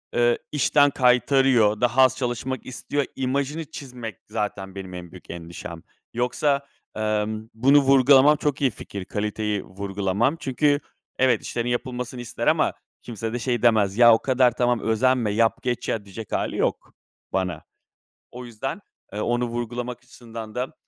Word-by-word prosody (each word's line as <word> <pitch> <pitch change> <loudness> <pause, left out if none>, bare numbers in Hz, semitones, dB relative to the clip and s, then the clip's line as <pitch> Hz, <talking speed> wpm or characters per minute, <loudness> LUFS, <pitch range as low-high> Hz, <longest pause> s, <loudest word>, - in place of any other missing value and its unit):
ııı, 120 0 +3
işten 145 0 +4
kaytarıyor, 125 -4 +3
daha 120 +2 +3
az 130 0 +4
çalışmak 125 0 -3
istiyor." 140 +2 -3
imajını 140 +4 -2
çizmek 125 - -7
zaten 100 -2 -4
benim 95 -2 -7
en 90 -1 -8
büyük 90 - -14
endişem. 85 -1 -8 0.3
Yoksa, 140 +4 0 0.3
ımm, 110 0 -2
bunu 135 +6 +5
vurgulamam 135 +2 +6
çok 145 0 -1
iyi 135 -3 +3
fikir, 100 -2 -8
kaliteyi 105 0 -2
vurgulamam. 100 - -1
Çünkü 145 +2 +1 0.4
evet, 130 -1 +3
işlerin 120 0 -3
yapılmasını 125 0 -3
ister 120 - -4
ama - - +3 0.3
kimse 115 -1 -5
de 120 - -2
şey 120 -2 -1
demez, 110 -4 +3
"Ya, 120 -1 +8
o 110 - +3
kadar 130 -2 +3
tamam, 120 0 +1
özenme; 115 0 +1
yap, 115 +2 +2
geç 125 -2 -2
ya." 105 -3 -2
diyecek 105 +2 -9
hâli - - -1
yok - - -1 0.4
bana. 90 -5 -2 0.7
O 125 +1 -9
yüzden, 120 - -5 0.3
ııı, 105 - -2
onu 120 +1 0
vurgulamak 120 +1 -4
açısından 115 -3 -10
da 125 +1 -3
120 Hz, 150 wpm, -24 LUFS, 105-130 Hz, 0.7 s, Ya